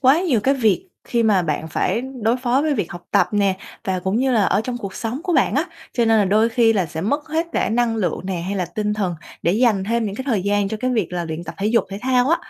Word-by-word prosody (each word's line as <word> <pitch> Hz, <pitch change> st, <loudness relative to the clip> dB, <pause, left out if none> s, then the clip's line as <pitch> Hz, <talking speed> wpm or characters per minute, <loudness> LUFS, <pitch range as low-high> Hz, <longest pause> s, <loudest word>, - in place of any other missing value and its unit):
quá 275 Hz, +5 st, +5 dB
nhiều 275 Hz, -, +1 dB
cái 270 Hz, +5 st, +2 dB
việc 260 Hz, -, +1 dB, 0.2 s
khi 235 Hz, -1 st, 0 dB
mà 205 Hz, -4 st, +3 dB
bạn 160 Hz, 0 st, -2 dB
phải 220 Hz, -, 0 dB, 0.2 s
đối 230 Hz, +3 st, +2 dB
phó 255 Hz, +2 st, +1 dB
với 305 Hz, -1 st, +1 dB
việc 205 Hz, -9 st, -2 dB
học 175 Hz, 0 st, -9 dB
tập -, -, +3 dB
nè, 200 Hz, -2 st, +2 dB, 0.3 s
và 185 Hz, -1 st, -1 dB
cũng 190 Hz, +3 st, -1 dB
như 260 Hz, +2 st, +2 dB
là 220 Hz, -4 st, +3 dB
ở 200 Hz, -, +2 dB
trong 245 Hz, -1 st, -3 dB
cuộc 195 Hz, -5 st, -6 dB
sống 235 Hz, +7 st, -4 dB
của 365 Hz, -, 0 dB
bạn -, -, +3 dB
á, -, -, +2 dB, 0.3 s
cho 235 Hz, -, +1 dB
nên 225 Hz, -1 st, +4 dB
là 205 Hz, -, +4 dB
đôi 215 Hz, +4 st, +3 dB
khi 230 Hz, -1 st, +3 dB
là 190 Hz, -5 st, +1 dB
sẽ 160 Hz, -, -5 dB
mất 285 Hz, -, -1 dB
hết 320 Hz, +2 st, 0 dB
cả -, -, +1 dB
năng 230 Hz, 0 st, +1 dB
lượng 180 Hz, -6 st, -1 dB
nè 185 Hz, -3 st, -2 dB
hay 190 Hz, +4 st, -3 dB
là 185 Hz, -, 0 dB
tinh 210 Hz, +4 st, -2 dB
thần 190 Hz, -5 st, -1 dB, 0.3 s
để 170 Hz, -, +2 dB
dành 215 Hz, -3 st, +2 dB
thêm 230 Hz, +2 st, 0 dB
những 200 Hz, -, -4 dB
cái 260 Hz, -, -5 dB
thời 220 Hz, -8 st, +1 dB
gian 200 Hz, 0 st, +1 dB
cho 220 Hz, -, -3 dB
cái 255 Hz, -, 0 dB
việc 220 Hz, -8 st, -1 dB
là 175 Hz, -1 st, -2 dB
luyện 160 Hz, +1 st, -5 dB
tập -, -, -7 dB
thể 200 Hz, -, 0 dB
dục 230 Hz, +2 st, +3 dB
thể 195 Hz, -, -5 dB
thao 255 Hz, 0 st, +2 dB
á. 335 Hz, -, +4 dB
220 Hz, 295 wpm, -21 LUFS, 190-250 Hz, 0.3 s, quá